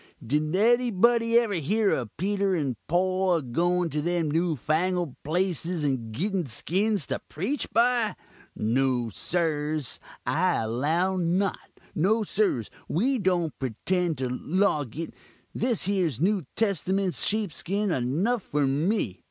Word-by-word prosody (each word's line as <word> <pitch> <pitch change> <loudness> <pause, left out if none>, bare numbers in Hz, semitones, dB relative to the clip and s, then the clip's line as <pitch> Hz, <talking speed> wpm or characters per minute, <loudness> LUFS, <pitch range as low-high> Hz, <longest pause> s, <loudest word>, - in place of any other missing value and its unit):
Did 150 +6 0
anybody 235 +1 +3
ever 235 -3 +2
hear 200 +6 +1
of 120 -5 -3
Peter 195 +2 +1
and 140 -7 -1
Poll 185 +1 +2
a 165 - 0
goin' 175 +8 +1
to 150 - -1
them 170 -1 0
new 165 +1 +1
fangled 165 +3 0
places 175 0 -1
and 130 -6 -1
gitten 180 - -1
skins 190 - 0
to - - -3
preach 215 - -2
by? 235 -3 +2 0.4
No, 125 +1 +1
sirs, 155 - -2 0.3
I 180 +3 +2
allow 155 +12 0
not; 185 +3 0 0.2
no, 215 +7 +2
sirs, 195 - 0 0.2
we 250 - +1
don't 180 -5 +1
pretend 165 - -1
to 130 0 -1
loguk 155 - -1 0.4
this 235 -3 +1
here 190 -3 +1
new 185 -2 +1
testament's 195 -2 0
sheepskin 200 0 0
enough 170 - 0
for 150 -5 0
me. 145 - 0
175 Hz, 125 wpm, -26 LUFS, 150-200 Hz, 0.4 s, anybody